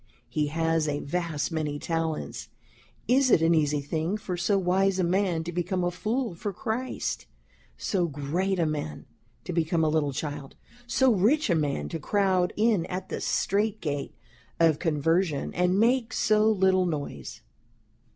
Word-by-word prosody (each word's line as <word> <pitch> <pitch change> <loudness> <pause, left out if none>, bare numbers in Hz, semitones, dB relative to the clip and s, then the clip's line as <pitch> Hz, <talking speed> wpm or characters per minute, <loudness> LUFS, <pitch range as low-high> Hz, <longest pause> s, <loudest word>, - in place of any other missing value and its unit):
He 150 -1 0
has 165 +1 0
a 145 -1 -1
vast 165 0 -2
many 155 -2 -2
Talents, 165 0 -3 0.6
is 260 +1 +4
it 165 - +5
an 165 +1 +4
easy 150 -2 +2
thing 160 +7 -2
for 190 -3 -4
so 185 +3 +1
Wise 190 +1 +2
a 185 - +1
man 175 -2 +1
to 170 - -5
become 180 +1 -1
a 175 - +1
Fool 215 +6 -2
for 200 +5 -4
Christ? 225 +7 -3 0.5
so 180 -4 0
great 165 +7 -1
a 170 - +2
man 145 - -4 0.4
to 180 - -5
become 165 0 +1
a 155 - +3
Little 150 -2 +1
Child? 145 0 -5 0.3
so 260 +1 +3
rich 220 - +2
a - - +4
man 145 -3 -1
to 165 - -4
crowd 185 +1 +1
in 210 -5 +2
at 185 +1 -5
the - - -4
Strait 210 +2 0
Gate 145 -3 -4 0.4
of 160 -3 +4
Conversion, 165 0 0
and 180 +2 +2
make 230 0 +2
so 215 0 +3
little 190 -3 +3
noise?... 145 - -5
175 Hz, 160 wpm, -27 LUFS, 155-195 Hz, 0.6 s, it